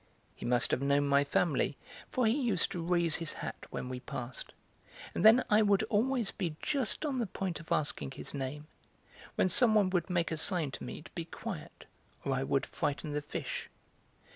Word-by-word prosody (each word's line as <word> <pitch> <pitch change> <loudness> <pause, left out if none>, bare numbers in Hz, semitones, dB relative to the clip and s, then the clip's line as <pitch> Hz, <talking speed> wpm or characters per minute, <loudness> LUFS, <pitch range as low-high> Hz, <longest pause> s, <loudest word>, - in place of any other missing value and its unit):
He - - -6
must 120 0 +3
have - - +1
known 140 +1 +3
my 140 0 +4
family, 145 -1 +1 0.3
for 255 - +1
he 220 - +4
used 240 -10 +1
to 175 - -3
raise 170 -1 +2
his 165 -2 -2
hat - - -6
when - - -4
we 130 0 -4
passed; 125 0 -6 0.6
and - - -1
then 225 +4 +8
I 210 +1 +5
would 200 -2 +4
always 235 +1 +2
be 170 -6 -3
just 275 0 -1
on 275 -4 -1
the 235 - 0
point 185 -3 -3
of 165 - -13
asking 145 -2 0
his 135 - -8
name, 140 +2 -4 0.7
when - - +3
some 220 +3 +6
one 200 -3 +4
would 180 -1 0
make 175 -2 +1
a 160 - -1
sign 160 -3 +1
to - - -7
me - - -7
to - - -14
be 170 -2 -5
quiet, - - -7 0.4
or 135 - +1
I 130 - 0
would 135 0 +1
frighten 150 0 -2
the 150 - -1
fish. 145 - -5
170 Hz, 200 wpm, -32 LUFS, 140-210 Hz, 0.7 s, then